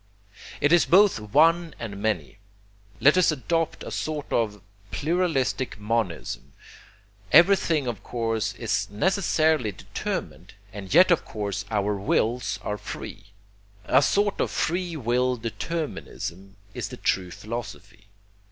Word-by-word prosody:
It 145 +3 +4
is 175 - +5
both 195 - +5
one 160 +9 +3
and 100 -4 -6
many 100 -4 -2 0.6
let 150 +6 +5
us 180 - +4
adopt 160 +3 -1
a - - -7
sort 155 -2 -4
of 105 -3 0 0.3
pluralistic 140 - 0
monism. 105 -6 -3 0.8
Everything 170 -4 +5
of 120 -5 -4
course 115 -3 -2
is - - -1
necessarily 155 - +1
determined, 90 -1 -6 0.2
and 100 -2 -8
yet 180 +6 +6
of 175 - +3
course 105 -1 -4
our 105 -1 0
wills 110 +5 0
are 105 0 -3
free: - - -8 0.6
a 130 - +4
sort 205 +7 +1
of - - 0
free 175 0 -1
will 125 -1 +1
determinism 115 - -5 0.2
is - - -4
the - - -8
true 90 -2 0
philosophy. 105 0 -8
120 Hz, 125 wpm, -25 LUFS, 105-165 Hz, 0.8 s, yet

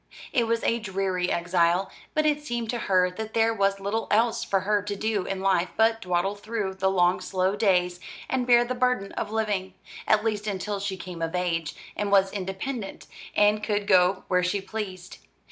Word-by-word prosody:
It 235 -2 +2
was 230 0 0
a 235 - +1
dreary 190 -3 -1
exile; 175 +1 +1 0.2
but 310 0 +2
it 300 -1 +2
seemed 240 -5 -3
to 240 - -3
her 180 -1 +4
that 220 +3 -7
there 225 0 +3
was 195 -2 +1
little 205 +3 -2
else 225 +2 +2
for 195 -1 0
her 205 +1 +1
to 205 0 -4
do 210 -2 -1
in 195 -1 -3
life 185 -2 +2
but 225 +1 +3
dawdle 180 +1 0
through 205 -1 -3
the 190 0 0
long 180 -1 +3
slow 185 +1 0
days, 180 -4 +2 0.3
and 250 -1 -1
bear 240 -1 +6
the 250 - -2
burden 250 -5 0
of - - -4
living; 205 -4 -2 0.3
at 215 -1 +4
least 215 -1 -1
until 200 0 -2
she 195 -1 -3
came 180 -3 -8
of 165 +2 -2
age, 165 -3 -1 0.2
and 205 -1 -2
was 195 -1 +4
independent, 195 +3 -5 0.3
and 210 0 +3
could 205 -1 0
go 185 -1 +4
where 180 -1 +2
she 180 +3 0
pleased. 190 -3 -6
200 Hz, 195 wpm, -26 LUFS, 185-220 Hz, 0.3 s, bear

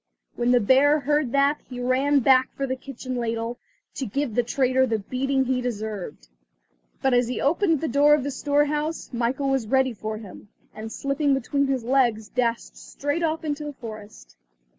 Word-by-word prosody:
When 240 0 0
the 245 0 +5
bear 275 +7 +4
heard 295 -2 +1
that 280 +1 +3
he 250 -1 -7
ran 265 +3 +2
back 260 +1 +4
for 275 - -2
the 260 -1 -2
kitchen 255 -1 -7
ladle, 230 0 -3 0.3
to 265 - -4
give 275 +2 -2
the 245 - +3
traitor 260 +1 +1
the 225 -2 0
beating 265 +5 -1
he 255 0 0
deserved. 210 - -5 0.8
But 265 - +3
as 245 -1 +3
he 250 - -3
opened 330 +1 +2
the 325 - -1
door 290 +1 +5
of 295 - -2
the 285 - -3
storehouse, 295 +3 -1
Michael 245 +4 -1
was 265 -5 0
ready 265 +1 +2
for 215 0 -5
him, 210 -1 -12 0.2
and 220 +1 -7
slipping 275 +2 0
between 280 +2 0
his 265 -3 -1
legs, 235 -4 +1
dashed 235 -2 -2
straight 290 +4 -3
off 320 -1 -1
into 300 0 -3
the 295 -1 -5
forest. 215 - -11
260 Hz, 185 wpm, -24 LUFS, 235-285 Hz, 0.8 s, the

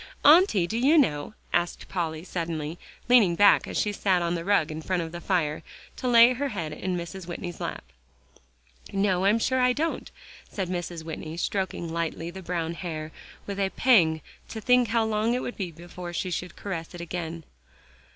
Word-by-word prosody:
"Auntie, 300 - +6
do 220 +6 -2
you 285 +6 +5
know?" 180 - +1 0.2
asked 175 0 -1
Polly 165 -3 -3
suddenly, 165 -3 -4 0.3
leaning 225 -8 +5
back, 205 +3 +5
as - - -4
she 210 - +1
sat 190 -3 +1
on 170 0 0
the 170 -1 -3
rug 170 -5 +2
in 155 +1 -5
front 180 +1 -1
of 160 - -7
the 175 0 -7
fire, 160 -6 0 0.4
to 255 - -3
lay 240 0 +7
her 280 +3 -2
head 170 - -4
in 185 +3 -3
Mrs. 175 +1 -7
Whitney's 175 0 -6
lap. - - -4 1.1
"No, 195 -2 +1
I'm 205 +3 +4
sure 260 +3 +1
I 250 0 +4
don't," 320 +5 -2 0.4
said 190 -3 -3
Mrs. 175 -2 -4
Whitney, 160 0 -6
stroking 180 -3 -2
lightly 165 0 -3
the 190 +2 -9
brown 170 -2 -2
hair, 160 -3 -5 0.3
with 200 -1 -5
a 195 -1 +1
pang 170 -11 +4 0.3
to 225 - -5
think 250 +2 +4
how 225 +1 +2
long 220 +2 +1
it 250 - -2
would 245 - -5
be 190 -4 -3
before 175 +1 -9
she 185 +1 -2
should 180 +1 -4
caress 175 -4 -6
it 175 - -7
again. 170 -1 -5
180 Hz, 190 wpm, -26 LUFS, 170-215 Hz, 1.1 s, lay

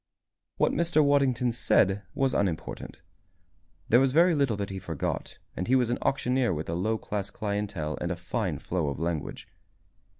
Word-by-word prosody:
What - - +3
Mr. 165 -3 +2
Waddington 135 -4 +3
said 100 -4 +2
was 135 -1 +1
unimportant. 90 -4 -2 0.9
There 120 - +6
was 135 0 +2
very 170 +3 +5
little 140 -8 +1
that 100 -1 -3
he 95 - -4
forgot 85 -6 -4 0.2
and 90 - -3
he 130 - +4
was 125 -2 +2
an 120 - -1
auctioneer 130 -6 +1
with 75 +2 -5
a - - -1
low 110 +6 0
class 100 -2 -4
clientele 100 -8 -3
and 85 - -1
a - - -1
fine 90 - -2
flow 85 +1 -2
of 70 - -2
language. 85 -2 -3
105 Hz, 170 wpm, -28 LUFS, 90-130 Hz, 0.9 s, There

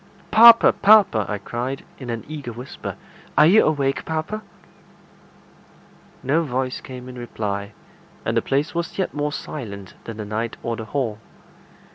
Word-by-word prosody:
"Papa! 230 +1 +8
papa!" 200 - +5
I 105 - -1
cried, 120 +6 -5
in 130 -3 -7
an 115 -1 -3
eager 145 -5 -6
whisper. 125 +3 -7 0.4
"Are 150 - +8
you 195 +7 +6
awake, 140 -3 0
papa?" 160 +7 -3 1.8
No 145 +6 +2
voice 130 -4 -2
came 125 -1 -9
in 125 -1 -9
reply, 100 -3 -4 0.5
and - - 0
the - - +3
place 140 +3 -1
was 170 -1 -3
yet 190 - -1
more 150 0 -1
silent 100 -11 -7
than 115 -2 -7
the 105 - -5
night 110 +2 -3
or 115 - -2
the 110 - -7
hall. 115 -4 -2
130 Hz, 150 wpm, -22 LUFS, 115-155 Hz, 1.8 s, Papa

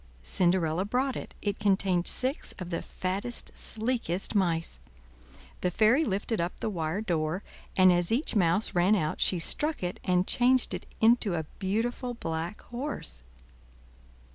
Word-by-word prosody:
Cinderella 175 - +2
brought 255 +6 0
it; - - -7
it 205 -1 -2
contained 190 -3 +2
six 260 +3 +1
of 180 -1 -7
the 170 - -2
fattest, 195 +6 -3
sleekest 220 -5 -1
mice. 165 - 0 0.8
The 180 - +1
fairy 220 - +4
lifted 205 - -1
up 170 +1 -3
the 220 - -2
wire 165 +1 -2
door, 170 -2 -1 0.3
and 185 -1 +7
as 175 +1 0
each 245 +2 +1
mouse 190 +2 +2
ran 180 +4 +4
out 155 -6 -1
she 185 - +4
struck 295 - 0
it 180 0 -3
and 180 0 +2
changed 250 +3 +3
it - - -6
into 225 -4 +4
a 160 - -1 0.2
beautiful 235 +5 -2
black 165 -1 -4
horse. 240 - -5
190 Hz, 145 wpm, -28 LUFS, 175-230 Hz, 0.8 s, and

